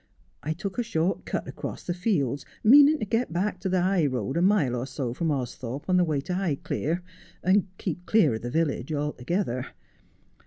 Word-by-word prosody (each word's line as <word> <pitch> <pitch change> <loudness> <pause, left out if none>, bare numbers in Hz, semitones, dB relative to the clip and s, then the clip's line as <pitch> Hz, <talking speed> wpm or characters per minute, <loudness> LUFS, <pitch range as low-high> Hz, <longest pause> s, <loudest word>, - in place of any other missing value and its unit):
I 155 - -2
took 190 +6 -5
a - - +2
short 180 -5 -1
cut - - -3
across - - -6
the 175 - -2
fields, 150 - 0 0.2
meanin' 285 +6 +8
to 215 - -3
get 225 +2 0
back 185 +5 -1
to 190 - -2
the 185 -1 +2
high 185 -5 +2
road 130 -1 -2
a 170 - +2
mile 180 -10 +3
or 125 +2 -3
so 130 -3 -3
from 165 +5 -1
Austhorpe 130 -1 -4
on 185 -1 +3
the 180 - +5
way 155 -4 0
to 180 +6 -4
Highclere, 170 -1 -1 0.4
and 190 +2 +3
keep 180 -1 -4
clear 210 - +4
of 110 - -4
the 120 - -4
village 145 -1 -1
altogether. 150 -1 -2
165 Hz, 195 wpm, -26 LUFS, 135-190 Hz, 0.4 s, meanin